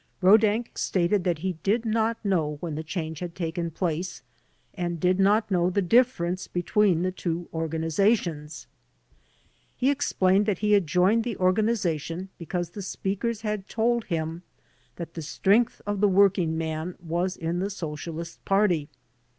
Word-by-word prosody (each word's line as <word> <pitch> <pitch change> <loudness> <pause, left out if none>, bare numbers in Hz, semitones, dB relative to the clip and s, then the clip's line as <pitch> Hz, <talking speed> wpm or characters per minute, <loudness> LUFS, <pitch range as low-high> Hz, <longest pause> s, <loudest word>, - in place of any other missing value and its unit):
Rodak 215 +4 +3
stated 180 +1 +1
that 175 -3 +1
he 180 -4 -2
did 225 +4 +1
not 225 +1 +1
know 160 -7 0
when 165 -1 -4
the 155 - -3
change 160 -1 -4
had 175 -2 -6
taken 170 0 -3
place 170 +1 -3 0.5
and 175 -3 -3
did 180 +3 +2
not 205 +2 +3
know 180 -1 +3
the 185 - 0
difference 185 -4 +2
between 180 0 +2
the 185 - 0
two 175 -2 -3
organizations. 160 0 0 1.1
He 260 +2 +3
explained 205 -8 +2
that 205 -4 +1
he 210 +2 0
had 200 -5 +4
joined 190 +7 +3
the 235 -4 -4
organization 185 -3 0
because 175 0 -3
the 205 - -7
speakers 205 +4 -3
h^d 210 -3 -3
told 235 0 0
him 165 -1 -3 0.5
that 170 -1 -7
the 165 - -6
strength 200 +9 +1
of 205 -1 -2
the 205 - +5
working 185 -4 +3
man 160 +2 -3
was 175 +2 -2
in 165 +2 -2
the 195 +2 -1
Socialist 165 -2 -6
Party. 195 -7 +2
185 Hz, 150 wpm, -26 LUFS, 165-205 Hz, 1.1 s, the